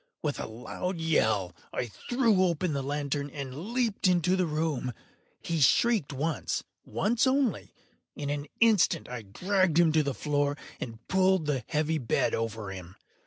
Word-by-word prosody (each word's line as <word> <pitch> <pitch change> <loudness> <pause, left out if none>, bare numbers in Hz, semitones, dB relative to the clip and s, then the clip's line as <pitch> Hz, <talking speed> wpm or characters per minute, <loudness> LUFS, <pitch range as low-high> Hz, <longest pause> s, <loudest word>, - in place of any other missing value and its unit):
With 150 -2 -1
a - - -3
loud 145 +11 -5
yell, 110 - +1 0.2
I - - -2
threw 225 - +1
open 170 -1 0
the 140 - -1
lantern 145 +1 -2
and 140 - -6
leaped 235 -6 +1
into 180 0 +3
the 185 -2 +1
room. 150 -5 -1 0.5
He 165 -1 -1
shrieked 210 - +3
once—once 165 - -1
only. 260 -3 0 0.4
In 145 -1 -3
an 145 0 -3
instant 205 -7 +4
I 125 -1 -5
dragged 180 - +1
him 170 -2 +5
to 155 0 +4
the 140 -3 -2
floor, 145 -1 0 0.2
and 115 -1 -7
pulled 190 -2 +3
the 140 -5 -1
heavy 155 +1 0
bed 120 - +1
over 115 -3 -3
him. 90 -1 -9
155 Hz, 155 wpm, -29 LUFS, 135-185 Hz, 0.5 s, him